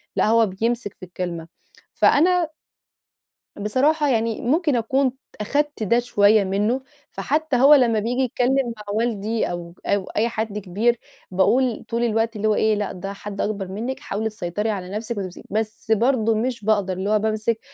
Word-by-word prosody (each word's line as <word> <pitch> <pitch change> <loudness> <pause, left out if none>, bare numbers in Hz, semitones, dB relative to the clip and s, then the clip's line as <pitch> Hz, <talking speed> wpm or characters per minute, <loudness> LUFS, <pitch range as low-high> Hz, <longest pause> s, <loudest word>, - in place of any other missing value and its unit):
لأ، - - +2
هو 225 +1 +5
بيمسك 215 +2 -2
في 185 - -8
الكلمة، 175 -2 -5 0.5
فأنا 345 +2 +3 1.1
بصراحة، 280 +9 +1
يعني 230 -3 0
ممكن 300 +3 +1
أكون 260 +3 +1 0.3
أخدت 290 +3 -1
ده 235 +4 +3
شوية 210 -3 +4
منه، 210 +7 0 0.3
فحتى 305 -1 -1
هو 270 +4 +7
لما 240 -6 +4
بييجي 240 +5 -1
يتكلم 255 0 +1
مع 210 - -10
والدي، 220 -1 -1
أو 170 -1 -6
أو 200 -1 +1
أي 220 +5 -1
حد 220 -2 -3
كبير 210 +5 0 0.3
باقول 235 +6 +2
طول 235 +1 -1
الوقت 225 0 0
اللي 215 +1 -1
هو 215 - +3
إيه 220 0 +2
"لأ، 205 -1 -2
ده 195 +2 -6
حد 200 0 -6
أكبر 200 -2 -2
منِك 225 +8 -4
حاولي 220 +2 -3
تسيطري 210 +1 -3
على 190 -4 -3
نفسِك 220 +3 -4
وتِمسكِ." 185 -3 -5
بس 215 +1 -3
برضه 225 0 +3
مش 230 -1 -2
باقدر 205 -3 +2
اللي 190 +2 -3
هو 215 0 +3
بامسك 220 +1 0
220 Hz, 165 wpm, -22 LUFS, 205-245 Hz, 1.1 s, هو